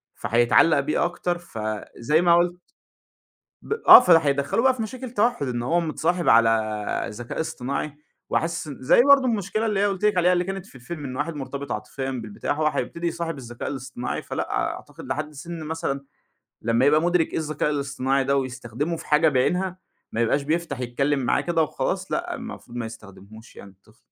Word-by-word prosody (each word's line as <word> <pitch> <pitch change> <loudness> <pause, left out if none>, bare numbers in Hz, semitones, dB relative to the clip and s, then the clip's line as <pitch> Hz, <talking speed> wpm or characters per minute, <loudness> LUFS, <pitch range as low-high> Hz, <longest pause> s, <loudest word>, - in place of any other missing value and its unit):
فهيتعلق 120 +6 +3
بيه 150 +4 0
أكتر، 175 0 -2
فزي 115 +1 -2
ما 175 -1 +5
قُلت 175 +1 +1 1.0
ب - - -3
آه، - - +13
فده 180 -9 +6
هيدخّله 140 +6 0
بقى 260 +1 +4
في 250 - -5
مشاكل 255 +2 -6
تَوحد، 230 - +1
إن 120 -1 -2
هو 165 +9 +1
متصاحب 170 0 0
على 110 -2 +2
ذكاء 115 +3 -6
اصطناعي. 140 0 -4 0.3
وحاسس 165 -1 -1
زي 135 - +3
برضه 280 -1 +6
المشكلة 215 -2 -1
اللي 210 -3 0
هي 200 - +3
قُلت 200 0 -1
لِك 210 -3 +2
عليها، 180 +1 +4
اللي 175 0 +1
كانت 195 0 -5
في 195 - -18
الفيلم، 145 +5 -7
إن 130 -1 -5
واحد 150 +5 -2
مرتبط 140 0 -6
عاطفيًا 120 +6 -4
بالبتاع، 115 -5 -4
هو 155 +1 0
هيبتدي 155 +4 -2
يصاحب 165 -2 -3
الذكاء 120 -2 -6
الاصطناعي. 130 -2 -5
فلأ، - - -4
أعتقد - - -4
لحد 150 +4 -4
سن 165 +3 -7
مثلًا 150 -3 -3 0.6
لمّا 115 +3 +2
يبقى 150 +2 +5
مُدرِك 175 -1 +1
إيه - - -1
الذكاء 155 -1 -1
الاصطناعي 140 -2 0
ده، 140 +1 +1
ويستخدمه 130 +4 -3
في - - -11
حاجة 155 +2 +4
بعينها، 180 +7 0 0.3
ما 115 - -1
يبقاش 120 +5 +2
بيفتح 155 -2 -2
يتكلم 135 +4 0
معاه 125 - +1
كده 170 -2 0
وخلاص، 185 +6 -3
لأ، 350 0 -2
المفروض 230 - -9
ما 120 - -3
يستخدمهوش 110 0 -12
يعني 100 - -12
الطفل. 100 +4 -26
150 Hz, 180 wpm, -24 LUFS, 125-175 Hz, 1.0 s, آه